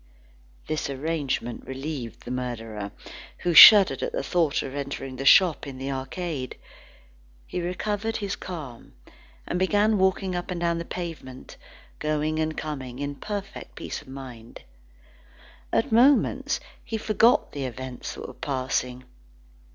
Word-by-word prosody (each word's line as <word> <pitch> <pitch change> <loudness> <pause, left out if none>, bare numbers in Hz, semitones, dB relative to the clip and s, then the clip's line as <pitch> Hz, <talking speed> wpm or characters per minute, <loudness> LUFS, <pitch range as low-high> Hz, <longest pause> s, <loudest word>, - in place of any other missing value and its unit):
This 155 -2 -2
arrangement 140 -4 -3
relieved 135 -3 -6
the 120 - -6
murderer, 115 -5 -4 0.5
who 175 - -1
shuddered 200 +4 +10
at - - -3
the - - -2
thought 165 -5 +1
of 135 - -6
entering 140 -2 -5
the 135 +2 -2
shop 180 -6 +6
in 135 -2 -7
the 135 +1 -4
arcade. 135 +1 -4 0.9
He 180 - -4
recovered 205 +5 -2
his 200 -1 -3
calm, 150 -10 -8 0.5
and 180 - -2
began 205 +2 +2
walking 190 0 +1
up 175 +1 -4
and 180 -2 -3
down 170 -1 0
the 170 - -5
pavement, 165 -9 -7 0.4
going 155 +1 -1
and 155 0 -1
coming, 135 -5 -5
in 145 +1 -3
perfect 200 +5 -7
peace - - -6
of - - -19
mind. 125 -4 -10 1.1
At 230 - +1
moments, 255 +5 +3 0.2
he 225 - -3
forgot 225 +2 +3
the 140 -2 -4
events 130 0 -6
that - - -7
were - - -9
passing. 130 -2 -2
150 Hz, 140 wpm, -26 LUFS, 130-185 Hz, 1.1 s, shuddered